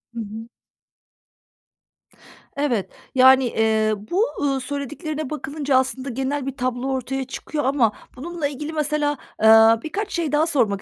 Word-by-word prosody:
Hı - - -4
hı. 220 +1 -7 2.1
Evet. 250 -9 0 0.3
Yani, 260 0 +7
eee, 220 -2 +1
bu, 295 - 0 0.2
ııı, 275 -2 +1
söylediklerine 285 +2 -5
bakılınca 285 -2 -1
aslında 260 +1 -1
genel 265 +3 -2
bir 270 -1 -5
tablo 250 +1 -2
ortaya 265 +1 -2
çıkıyor 295 +3 -4
ama 260 -4 +2 0.2
bununla 320 +3 -3
ilgili 295 +3 -6
mesela, 295 -1 0 0.3
ııı, 225 +1 +7
birkaç 400 +7 -4
şey 330 -4 -1
daha 300 +2 +2
sormak 225 - +1
270 Hz, 135 wpm, -22 LUFS, 245-295 Hz, 2.1 s, Yani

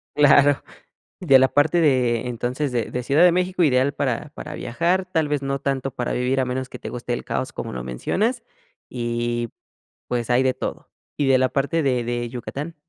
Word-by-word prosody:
Claro, 145 -1 +5 0.6
de 135 -1 +6
la 130 - +5
parte 150 +5 +2
de 125 -5 +2
entonces, 125 +4 -2
de 120 -2 -1
de 125 - -3
Ciudad 145 +7 +3
de 180 - +7
México 180 +1 +1
ideal 135 -1 +3
para 135 +1 -2
para 150 - -7
viajar, 170 +10 0
tal 160 -4 0
vez, 145 -1 0
no 135 0 -2
tanto 135 -1 -2
para 125 -1 -3
vivir, 125 +2 0
a 130 - 0
menos 130 +1 -3
que - - -9
te - - -6
guste 120 0 -4
el - - -3
caos - - -3
como - - -5
lo 60 -1 -5
mencionas, 190 - -1 0.5
y 120 -1 -2 0.6
pues, 120 -1 -2
hay 125 +1 +3
de 130 -1 +2
todo, - - -6 0.3
¿y 145 - +1
de 135 -1 +5
la 130 0 +2
parte 145 +4 0
de 125 -3 +1
de 120 0 -3
Yucatán? 140 +6 -6
130 Hz, 200 wpm, -22 LUFS, 120-150 Hz, 0.6 s, de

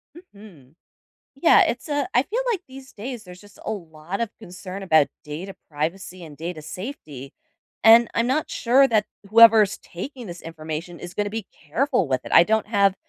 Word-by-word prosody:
Mhm. 200 - -16 0.6
Yeah, 325 - +6
it's 240 +6 -2
a 290 -2 -1
I 245 - +5
feel 450 - -3
like 380 - -2
these 265 0 -12
days, 235 +1 -7
there's 180 0 -13
just 205 -1 -18
a - - -3
lot 170 0 -6
of 230 -2 -1
concern 190 -1 -9
about 160 -6 +4 0.2
data 170 +6 -7
privacy 170 +4 -4
and 150 -2 -12
data 165 -1 -6
safety 155 - -8 0.5
and 230 +1 +8
I'm 230 +1 +1
not 285 +5 0
sure 265 +3 +3
that 215 -2 +2 0.2
whoever's 220 -2 +7
taking 245 +6 -8
this 175 -1 -8
information 160 +1 -7
is 175 0 -8
gonna 205 0 -1
be 220 -2 -5
careful 190 - -1
with 130 -1 -1
it. - - -9
I 170 - +8
don't 220 +1 +1
have 200 -3 +3
200 Hz, 180 wpm, -23 LUFS, 165-235 Hz, 0.6 s, and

